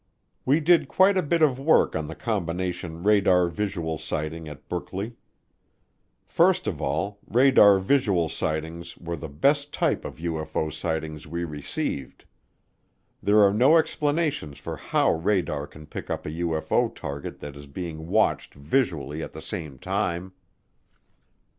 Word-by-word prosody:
We 140 +4 +4
did 170 +2 +4
quite 195 +1 +4
a 185 - +3
bit 165 +1 +1
of 135 -4 +3
work 155 +4 +3
on 80 -1 -2
the - - -7
combination 90 -5 -3
radar 95 -4 +4
visual 85 -5 -3
sighting 80 +1 -4
at 75 -1 -12
Brookley. 95 +5 -4 1.1
First - - +3
of - - -3
all, 100 0 -2
radar 120 -5 +6
visual 95 -5 +2
sightings 80 +3 -4
were 85 0 -5
the 80 -2 -7
best 140 - +1
type - - 0
of - - -7
UFO 80 -2 -3
sightings 80 -1 -4
we 85 +2 -3
received. 75 -3 -4 1.0
There 105 +1 +5
are 100 0 +5
no 130 +10 +6
explanations 150 - 0
for - - -6
how - - +1
radar 85 -4 0
can 75 0 -13
pick - - -8
up - - -3
a 75 - -4
UFO 80 -1 0
target 70 0 -6
that 75 -1 -8
is 70 0 -11
being 80 +1 -6
watched 110 +4 +1
visually 75 - -1
at - - -7
the - - -8
same 75 -5 -5
time. 95 +1 -2
85 Hz, 145 wpm, -25 LUFS, 80-105 Hz, 1.1 s, radar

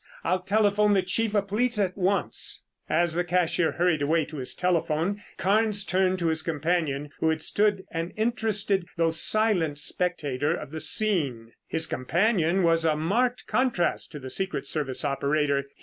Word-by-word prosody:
I'll 185 +2 +1
telephone 205 +1 +2
the 190 - +2
chief 215 +3 -1
of 200 -1 +1
police 230 +4 0
at 190 -3 0
once." 185 - -1 0.2
As 170 +1 +2
the 175 +2 0
cashier 175 -1 +1
hurried 175 -3 +1
away 155 +2 +2
to 155 - -9
his 130 -2 -1
telephone 180 +2 0 0.2
Carnes 205 +1 +1
turned 185 0 +1
to 170 -2 -1
his 160 0 0
companion 155 -2 -1
who 160 - +2
had 160 0 -1
stood 205 -2 +1
an 165 +1 -3
interested, 215 -5 0
although 165 -1 +2
silent 175 -4 +1
spectator 150 -3 0
of 140 - -8
the 160 - -5
scene. 145 - 0 0.2
His 160 0 0
companion 175 - +1
was 165 -1 +3
a 160 -2 +2
marked 235 +11 0
contrast 250 -9 0
to 150 - -6
the 130 -1 -7
secret 185 -4 -2
service 140 -2 -2
operator. 140 0 0
175 Hz, 165 wpm, -26 LUFS, 155-200 Hz, 0.2 s, was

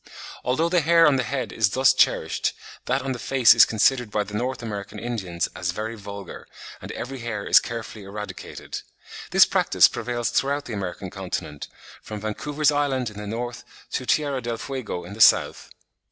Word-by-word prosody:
Although 150 +7 +1
the 175 -1 +3
hair 165 +2 +5
on 145 -3 +4
the - - +1
head 125 -2 -3
is 110 -3 +2
thus 130 +5 +4
cherished, - - +1 0.3
that 130 +2 0
on 135 - -2
the 125 - -4
face 130 -2 +5
is 115 - +8
considered 125 +2 +2
by 105 0 0
the 105 +1 -11
North 125 +3 -3
American 105 -1 -6
Indians 95 -8 -3
"as 90 - -3
very 110 +3 -4
vulgar," 100 -2 -9 0.3
and - - -7
every 135 +2 -6
hair 115 -4 -4
is - - +7
carefully 115 -2 -7
eradicated. 105 +1 -7 0.5
This - - +7
practice - - +4
prevails 120 0 -3
throughout 140 +1 0
the 120 - -6
American 95 -2 -5
continent 90 -6 -5 0.3
from 105 -1 -7
Vancouver's 145 +8 0
Island 135 -5 0
in 105 - -13
the 105 - -6
north 120 +2 -5 0.3
to - - -3
Tierra 140 -4 +1
del 120 -1 -3
Fuego 120 -9 -5
in 90 +3 -9
the 110 - -5
south. - - +4
115 Hz, 180 wpm, -24 LUFS, 105-130 Hz, 0.5 s, is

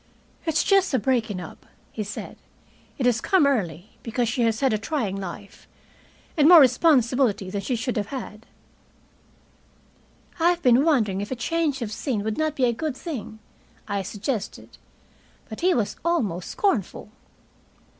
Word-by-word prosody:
"It's 320 0 +2
just 390 -7 +3
a - - +4
breaking 225 -4 0
up," 175 - -10 0.3
he 215 - -4
said. 205 +1 -7 0.6
"It 260 - -1
has 235 -2 +2
come 375 -6 +3
early, 195 - -2
because 235 +1 -1
she 245 +2 -1
has 225 -1 +1
had 265 -4 +2
a 215 - 0
trying 225 -6 -2
life, 195 +1 -8 0.7
and 300 0 +5
more 350 -2 +10
responsibility 250 - +3
than 200 0 -3
she 245 +6 -2
should 235 +1 -3
have 205 -1 -1
had." 230 -3 -8 1.9
"I 335 +1 +4
have 350 -1 -1
been 250 +1 +5
wondering 220 - +1
if 205 - -5
a 260 - -3
change 290 +1 -1
of 215 - -5
scene 220 -2 -2
would 220 0 -2
not 310 -1 0
be 260 - +2
a 240 - +2
good 295 +2 -4
thing," 270 - -6 0.5
I 200 -1 -1
suggested. 210 +3 -5 0.7
But 220 - -8
he 365 +2 +3
was 220 -5 -1
almost 220 - -1
scornful. 230 - -1
240 Hz, 160 wpm, -24 LUFS, 210-285 Hz, 1.9 s, more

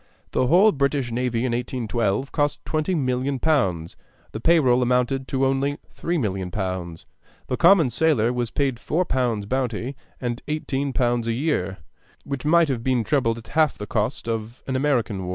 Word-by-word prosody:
The 130 - +1
whole 190 +9 +6
British 140 -4 0
navy 120 0 -1
in 125 - 0
1812 120 0 -1
cost 145 -1 -1
20,000,000 140 -5 0
pounds; 95 - 0 0.4
the 110 - -5
pay 165 +7 +4
roll 125 -3 +3
amounted 125 +2 +1
to 135 0 0
only 135 +2 0 0.2
3,000,000 105 - -2
pounds; 90 -4 -4 0.4
the 125 - -2
common 170 -4 +5
sailor 125 -5 +2
was 120 -2 -1
paid 135 -3 -1
four 180 +4 0
pounds 120 -8 0
bounty 125 +2 -2 0.2
and 120 -1 -3
eighteen 140 -2 -2
pounds 120 -3 0
a 115 - +1
year, 115 - -1 0.5
which 140 0 -5
might 170 +1 +5
have 125 -5 -2
been 125 -2 +1
trebled 115 -2 +1
at 115 - -12
half 155 -2 +2
the 105 - -5
cost 110 +4 -2
of 115 +1 -4
an 130 - -2
American 120 -9 0
war. - - -4
125 Hz, 170 wpm, -23 LUFS, 115-145 Hz, 0.5 s, whole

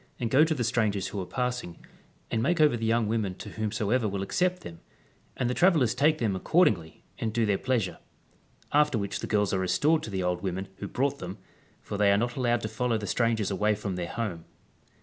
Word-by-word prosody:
and 115 -2 -2
go 140 +4 +6
to 160 0 +1
the 125 - -1
strangers 110 -5 0
who 100 - -4
are 90 - -6
passing, 125 -9 -3 0.5
and 115 - 0
make 170 +8 +1
over 150 -5 +5
the 115 -1 -2
young 115 -1 +2
women 105 -4 -1
to - - -9
whomsoever 110 +2 -1
will 100 0 -3
acccj)t 180 - 0
them; 85 - -9 0.6
and 125 - 0
the 125 - 0
travellers 155 -8 +3
take 155 +3 +3
them 110 -7 0
accordingly 95 - +1 0.2
and 110 - -1
do 115 -1 +2
their 105 -2 +2
pleasure; 120 -8 -1 0.7
after 150 -3 +3
which 100 -2 -3
the - - -4
girls 105 -2 +1
are 95 - +1
restored 150 - +2
to - - -6
the 95 -2 -2
old 90 0 -1
women 95 0 -3
who 100 - -5
brought 140 +6 -1
them, 90 +2 -6 0.5
for 100 - -5
they 100 -1 +5
are 100 - +4
not 120 +3 -1
allowed 120 -3 +1
to - - -3
follow 115 +1 -1
the 105 - -5
strangers 115 -2 0
away 105 +2 +1
from 100 -2 -4
their 90 -1 -3
home. 100 -8 -4
110 Hz, 220 wpm, -28 LUFS, 100-125 Hz, 0.7 s, go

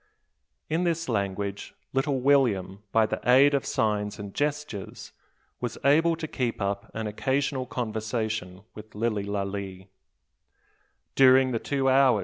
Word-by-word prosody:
In 160 +3 0
this 170 -1 -1
language, 100 -2 -3 0.2
little 135 0 0
William, 110 -9 +2
by 110 -1 +4
the - - -3
aid 135 +4 +6
of 140 - 0
signs 105 -2 0
and 100 -2 -8
gestures, 145 -8 -4 0.5
was - - -4
able 165 +4 +4
to 160 -1 -5
keep 125 -5 -2
up 100 0 -2
an 110 0 -3
occasional 130 +4 -1
conversation 110 -5 -3
with 110 0 -12
Lilly 105 -2 -1
Lalee. 100 -1 -4
110 Hz, 115 wpm, -26 LUFS, 100-135 Hz, 0.5 s, aid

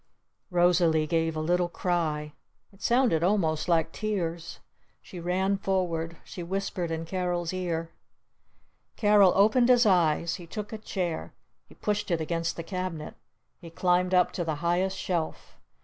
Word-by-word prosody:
Rosalee 175 -3 +3
gave 165 0 0
a - - -2
little 175 +2 +1
cry. 155 -4 -2 0.4
It 195 - -20
sounded 240 -9 +3
almost 170 -4 +1
like 165 -1 +2
tears. 175 -6 -3 0.4
She 180 - -10
ran 190 +3 0
forward. 170 -4 -1
She 180 - -8
whispered 185 -1 -3
in 165 0 -3
Carol's 175 -1 -2
ear. 165 -3 -3 1.0
Carol 205 -3 +5
opened 220 +5 +4
his 245 -1 +6
eyes. 170 -4 +2
He 175 -3 -11
took 210 +4 -6
a 220 - -5
chair. 175 - -4 0.3
He - - -17
pushed 205 -1 -2
it 170 -2 +1
against 165 +1 -2
the 165 - -5
cabinet. 180 -3 -5 0.5
He 170 - -10
climbed 180 +2 +1
up 180 -1 +4
to 175 - -3
the 160 -2 -2
highest 185 +3 +1
shelf. 170 -4 -3
175 Hz, 150 wpm, -27 LUFS, 165-190 Hz, 1.0 s, his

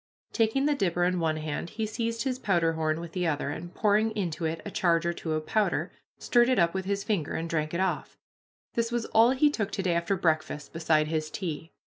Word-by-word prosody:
Taking 230 +4 +2
the 295 - +3
dipper 175 -9 0
in 180 0 +1
one 160 -2 0
hand, 155 +2 -4
he 220 0 -3
seized 230 +1 -2
his 255 -2 -2
powderhorn 165 -6 +1
with 170 -1 -7
the 180 -1 -1
other, 145 -2 -1
and, 175 +4 -6
pouring 215 +2 +2
into 170 -4 -2
it 160 +1 -2
a 205 - -5
charge 170 -3 +2
or 170 - +1
two 160 -2 -4
of 155 0 -2
powder, 215 -1 0 0.3
stirred 240 0 +3
it 255 - +3
up 170 -1 +3
with 190 0 -3
his 200 0 -1
finger, 190 -9 -1
and 165 - -2
drank 155 -2 -1
it 170 - -2
off. 190 0 -1 0.6
This 230 0 0
was 240 -1 -1
all 225 +2 +5
he 275 +3 +3
took 215 -7 -2
to 195 - -2
day 180 -2 +1
after 170 +3 0
breakfast 155 -3 -1
beside 160 -2 +2
his 155 -1 -1
tea. 165 -3 -5
175 Hz, 225 wpm, -28 LUFS, 160-220 Hz, 0.6 s, all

